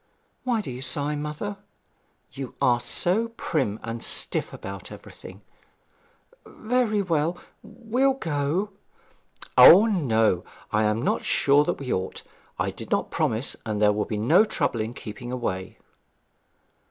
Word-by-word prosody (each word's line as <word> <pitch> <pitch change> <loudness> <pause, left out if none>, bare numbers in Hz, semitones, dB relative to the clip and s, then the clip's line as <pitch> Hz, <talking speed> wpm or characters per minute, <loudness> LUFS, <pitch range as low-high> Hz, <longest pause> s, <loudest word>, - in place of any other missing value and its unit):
'Why 240 -3 0
do 135 - -7
you 125 +1 -7
sigh, 145 +3 -1
mother?' 150 +8 -5 0.7
'You 135 -2 -7
are 120 -1 +3
so 185 - +1
prim 130 - -1
and 115 0 -5
stiff - - 0
about 100 -1 -8
everything.' 95 +2 -12 1.0
'Very 220 -3 -1
well 165 -1 0 0.2
we'll 255 +4 0
go.' 165 - -1 0.9
'O 200 +5 +10
no 115 - +1 0.3
I 110 +1 +2
am 105 +2 0
not - - 0
sure 145 +1 +3
that - - -1
we 135 -3 -3
ought. 95 0 -4 0.3
I - - -1
did - - -9
not - - 0
promise, 115 +5 0
and 110 -3 -3
there 105 0 +4
will 105 0 -1
be 110 - -4
no 155 - +5
trouble 140 - -1
in 110 +3 -5
keeping 120 +3 -8
away.' 95 -7 -4
140 Hz, 140 wpm, -25 LUFS, -, 1.0 s, O